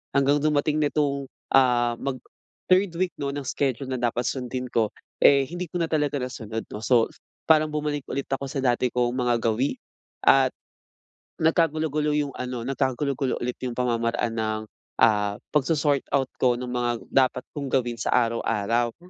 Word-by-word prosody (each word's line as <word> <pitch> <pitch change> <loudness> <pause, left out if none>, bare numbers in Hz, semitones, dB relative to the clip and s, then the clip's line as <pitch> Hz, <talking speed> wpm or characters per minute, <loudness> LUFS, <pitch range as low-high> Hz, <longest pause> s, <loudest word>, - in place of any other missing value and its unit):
hanggang 140 +1 +3
dumating 150 0 +2
nitong, 145 -2 0 0.3
ah, 125 -3 +4
mag-third 180 +8 -1
week 185 0 0
'no, 140 - -1
ng 140 0 -4
schedule 135 -1 -1
na 130 -1 -3
dapat 120 0 0
sundin 125 0 -3
ko, 110 -2 +2 0.3
eh, 140 -1 +6
hindi 175 +5 -5
ko - - -2
na 170 - +2
talaga 150 -2 0
nasunod, 115 -3 -5
'no? 105 - -6
So, 120 -2 +4 0.4
parang 155 -1 +5
bumalik 150 -1 -2
ulit 140 - -2
ako 135 0 -2
sa 140 - -5
dati 125 -1 +2
kong 120 -1 +1
mga 125 -1 +1
gawi 115 - 0 0.5
at - - +6 0.9
nagkagulo-gulo 155 -2 +1
yung 145 -2 0
ano, 125 -2 -4
nagkagulo-gulo 135 0 -1
ulit 125 0 -3
yung 125 -2 -3
pamamaraan 115 -1 0
ng, 110 -1 -1 0.4
ah, 105 -2 +3 0.2
pagso-sort 145 0 +2
out 135 -2 0
ko 125 -1 +3
nung 125 0 -5
mga 120 -1 -1
dapat 130 -1 +2
kong 140 -2 -5
gawin 120 -3 0
sa - - -2
araw-araw. 115 -1 +1
130 Hz, 155 wpm, -25 LUFS, 120-145 Hz, 0.9 s, eh